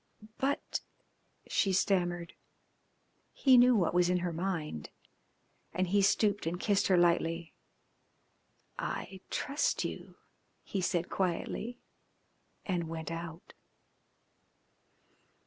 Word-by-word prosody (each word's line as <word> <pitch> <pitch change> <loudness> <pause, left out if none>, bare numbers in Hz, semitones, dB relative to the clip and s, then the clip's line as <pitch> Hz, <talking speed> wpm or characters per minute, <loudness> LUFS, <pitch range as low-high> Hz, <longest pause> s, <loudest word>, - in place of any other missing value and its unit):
"But 275 +1 -1 0.3
" - - -44 0.3
she 195 - +2
stammered. 175 -2 +1 1.0
He 265 -2 +5
knew 250 0 +7
what 180 -6 +2
was 180 0 +4
in 180 -1 +2
her 175 - -2
mind, 160 - -3 0.9
and 185 -1 0
he 200 +2 +4
stooped 200 -1 +2
and 175 +2 -2
kissed 200 -1 +2
her 185 - +4
lightly. 170 -1 +2 1.3
"I 190 -1 -4
trust 285 +1 0
you," - - -6 0.5
he 195 - -3
said 175 -1 0
quietly, 195 +6 -2 0.9
and 175 -4 -1
went 160 0 -5
out. 165 0 -7
180 Hz, 105 wpm, -32 LUFS, 170-200 Hz, 1.3 s, knew